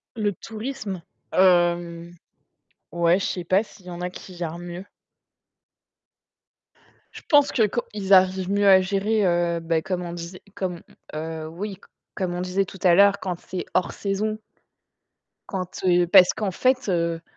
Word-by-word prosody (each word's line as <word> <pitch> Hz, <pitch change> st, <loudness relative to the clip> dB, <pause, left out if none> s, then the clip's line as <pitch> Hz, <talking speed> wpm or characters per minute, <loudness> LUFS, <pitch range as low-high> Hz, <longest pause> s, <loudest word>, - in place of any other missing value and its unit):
Le 210 Hz, -2 st, 0 dB
tourisme? 215 Hz, -4 st, -6 dB, 0.3 s
Hem 175 Hz, -2 st, +2 dB, 0.8 s
ouais, 170 Hz, +1 st, +3 dB
je -, -, -2 dB
sais 180 Hz, -, -3 dB
pas 185 Hz, +4 st, +2 dB
s'il 195 Hz, -4 st, -18 dB
y -, -, -7 dB
en 175 Hz, -, -7 dB
a 180 Hz, -, -2 dB
qui 185 Hz, 0 st, -11 dB
gère 170 Hz, 0 st, -4 dB
mieux. 175 Hz, +2 st, -8 dB, 2.3 s
Je -, -, -10 dB
pense 290 Hz, -3 st, +5 dB
que 220 Hz, -, +3 dB
quand 240 Hz, +4 st, -1 dB
ils 200 Hz, -2 st, 0 dB
arrivent 185 Hz, 0 st, +4 dB
mieux 200 Hz, 0 st, +2 dB
à 190 Hz, -1 st, +7 dB
gérer 200 Hz, +3 st, 0 dB
heu, 175 Hz, -1 st, +1 dB
bah 165 Hz, -1 st, 0 dB
comme 180 Hz, 0 st, -3 dB
on 170 Hz, -, -6 dB
disait, 175 Hz, +1 st, -8 dB
comme 180 Hz, -3 st, -4 dB, 0.3 s
heu, 160 Hz, 0 st, -5 dB
oui, 190 Hz, +4 st, -6 dB, 0.3 s
comme 185 Hz, -2 st, -3 dB
on 175 Hz, -, -3 dB
disait 185 Hz, +2 st, 0 dB
tout 190 Hz, 0 st, -12 dB
à 180 Hz, -2 st, +6 dB
l'heure, 200 Hz, +2 st, +5 dB
quand 180 Hz, -3 st, -4 dB
c'est 185 Hz, -1 st, -6 dB
hors 185 Hz, -, +1 dB
saison 210 Hz, +2 st, -2 dB, 1.1 s
quand, 185 Hz, -1 st, -5 dB
heu 175 Hz, -1 st, +4 dB
parce 180 Hz, +1 st, +7 dB
qu'en 205 Hz, -3 st, -2 dB
fait 255 Hz, +3 st, +1 dB
heu 170 Hz, -2 st, 0 dB
185 Hz, 160 wpm, -24 LUFS, 175-200 Hz, 2.3 s, à